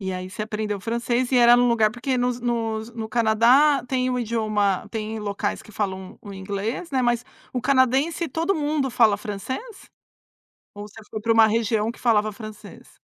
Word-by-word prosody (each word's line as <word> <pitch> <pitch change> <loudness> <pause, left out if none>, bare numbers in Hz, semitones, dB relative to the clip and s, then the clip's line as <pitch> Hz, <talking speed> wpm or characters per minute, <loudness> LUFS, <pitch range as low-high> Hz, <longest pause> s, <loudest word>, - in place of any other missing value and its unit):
E 190 -1 -3
aí 185 0 -5
você 200 +3 -5
aprendeu 210 -2 -3
francês 240 +3 -1
e 255 - +4
era 240 0 +7
no 245 - +3
lugar 220 -2 +3
porque 250 +2 -2
nos 245 0 -1
nos 225 -2 -2
no 225 -2 -6
Canadá 240 +6 +4
tem 255 -1 0
o 250 - -1
idioma, 215 -4 0
tem 220 0 -4
locais 205 -1 -3
que - - -15
falam 190 -2 -4
o 200 - -10
inglês, 200 - -4
né, 265 -2 +1
mas, 240 0 +1 0.3
o 250 - -2
canadense 275 +6 +2
todo 330 +8 -1
mundo 295 -3 -1
fala 225 -4 +4
francês? 260 - -7 0.9
Ou 205 0 -8
você 215 +2 -14
foi 215 - -5
para 225 +1 +1
uma 225 -1 +6
região 220 0 0
que - - -18
falava 215 -3 +2
francês? 215 0 -12
230 Hz, 185 wpm, -23 LUFS, 210-250 Hz, 0.9 s, era